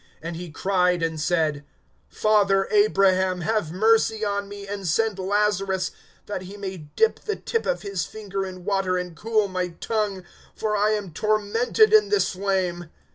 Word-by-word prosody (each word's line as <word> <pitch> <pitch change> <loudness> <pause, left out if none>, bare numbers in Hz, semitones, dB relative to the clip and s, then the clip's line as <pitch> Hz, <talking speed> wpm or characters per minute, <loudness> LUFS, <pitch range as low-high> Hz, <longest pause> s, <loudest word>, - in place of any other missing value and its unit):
(24)And 165 0 -4
he 175 +1 -7
cried 180 +1 +1
and 160 -1 -2
said: 155 -3 0 0.5
Father 200 -2 +2
Abraham, 190 -3 +3
have 210 -3 -1
mercy 220 +3 +2
on 200 0 -2
me, 200 0 -8
and 200 -2 -5
send 210 +4 +1
Lazarus, 195 -1 0 0.3
that 205 -3 -4
he 190 +2 -9
may 190 -2 -5 0.2
dip 445 - +3
the 425 - -3
tip 455 - -2
of - - -1
his 195 -4 -2
finger 200 -2 -5
in 185 -2 -8
water, 195 -2 +1
and 180 -2 -5
cool 215 +1 +1
my 185 -1 -2
tongue; 210 -4 -2 0.3
for 215 -1 -1
I 210 +1 +2
am 200 -6 -4
tormented 215 - +2
in 425 -1 +6
this 415 -1 +2
flame. 185 -3 -2
195 Hz, 165 wpm, -24 LUFS, 185-215 Hz, 0.5 s, in